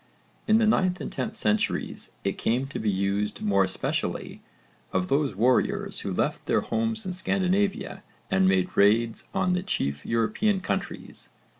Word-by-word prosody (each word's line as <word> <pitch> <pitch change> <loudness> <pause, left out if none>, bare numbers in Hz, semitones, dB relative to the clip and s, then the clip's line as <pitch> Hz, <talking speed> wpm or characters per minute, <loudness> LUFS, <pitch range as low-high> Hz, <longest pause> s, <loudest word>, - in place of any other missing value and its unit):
In 215 0 +5
the 225 - +3
9th 185 -4 +2
and - - -5
10th 130 - -3
centuries 105 0 -1
it 100 - -2
came 125 +4 +1
to - - -5
be 110 - 0
used 100 +2 -1
more 100 -2 +3
especially 95 0 -2 0.5
of 90 -1 -1
those 140 -3 +1
warriors 125 +5 +1
who - - -4
left - - -1
their - - +3
homes 225 -1 -1
in 185 - -3
Scandinavia 190 +2 0 0.3
and 95 0 +4
made 95 -1 +1
raids 115 +3 +3
on 190 -2 +1
the 180 - 0
chief 70 - -2
European 115 - +1
countries. - - -4
120 Hz, 155 wpm, -26 LUFS, -, 0.5 s, In